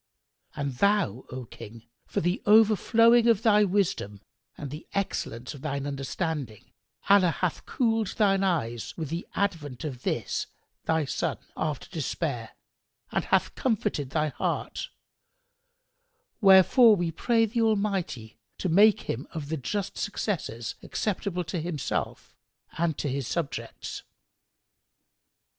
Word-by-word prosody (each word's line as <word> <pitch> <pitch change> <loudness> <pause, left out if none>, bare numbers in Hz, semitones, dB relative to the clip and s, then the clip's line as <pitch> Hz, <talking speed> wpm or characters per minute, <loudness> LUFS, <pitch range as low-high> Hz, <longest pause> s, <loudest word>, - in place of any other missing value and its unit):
And 140 -3 -3
thou, 200 - +2
O 130 0 -6
King, 115 0 -11 0.2
for - - -1
the 175 +3 0
overflowing 225 +2 +5
of 225 -2 +3
thy 210 -2 +5
wisdom 180 - 0 0.4
and 140 -3 -6
the 150 +2 -8
excellence 130 - -3
of 140 - -11
thine 140 0 -3
understanding, 140 - -4 0.4
Allah 195 -3 +6
hath 170 0 -2
cooled 225 -4 +1
thine 195 -2 +3
eyes 120 - -1
with 160 -4 -4
the 170 +3 -4
advent 160 -10 -2
of 130 -5 -5
this - - -2 0.4
thy 160 -2 +1
son, - - -2 0.2
after - - -3
despair, - - -3 0.6
and - - -1
hath - - +2
comforted 205 - -1
thy 155 +2 0
heart; - - -3 1.5
wherefore 205 +4 +7
we 175 -3 -1
pray 225 +7 +2
the 230 +2 -1
Almighty 200 - -1 0.2
to 185 - -2
make 205 +5 +6
him 125 +5 -4
of 145 -3 -5
the 160 - -1
just 195 +8 -3
successors 160 - -3
acceptable 190 -3 -2
to 165 +1 -3
Himself 160 -4 -3 0.4
and 165 -2 0
to - - -2
his 135 -2 -2
subjects." 165 -5 -4
170 Hz, 125 wpm, -27 LUFS, 140-205 Hz, 1.5 s, wherefore